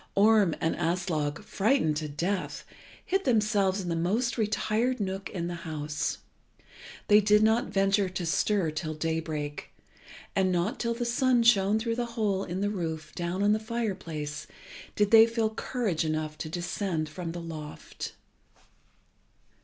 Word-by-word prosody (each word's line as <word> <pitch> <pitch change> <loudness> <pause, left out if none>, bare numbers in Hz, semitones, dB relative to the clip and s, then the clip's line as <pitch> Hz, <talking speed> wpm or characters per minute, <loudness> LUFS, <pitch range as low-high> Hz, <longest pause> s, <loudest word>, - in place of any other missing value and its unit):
Orm 205 -4 +5
and 160 - 0
Aslog, 165 -2 -1
frightened 205 - +1
to 155 0 -3
death, 180 +6 -2 0.4
hid 385 +1 0
themselves 210 -5 +2
in 180 - -4
the 170 - 0
most 220 +9 0
retired 220 +3 0
nook 195 -1 -3
in 170 -3 -4
the 175 - -3
house. 150 -2 -3 0.9
They 210 0 +7
did 210 +1 +4
not 220 +2 +3
venture 195 0 +2
to 185 -1 -4
stir 165 +2 +1
till 155 0 -4
daybreak, 155 -2 -3 0.7
and 190 -1 +2
not 180 +5 0
till 235 -1 -1
the 240 +1 -2
sun 245 0 +3
shone 210 -2 +4
through 230 +1 -2
the 240 -1 -1
hole 200 -3 +1
in 180 +1 -4
the 205 0 0
roof 160 -5 -4
down 175 +2 -2
on 205 - +4
the 215 - +1
fire 225 -1 -2
place 150 -4 -6 0.5
did 210 -1 +2
they 225 0 +9
feel 230 -1 0
courage 220 -9 -1
enough 155 -1 -2
to 155 - -4
descend 175 -1 -2
from 165 +2 -5
the 175 - -5
loft. 155 -3 -7
190 Hz, 155 wpm, -28 LUFS, 160-215 Hz, 0.9 s, they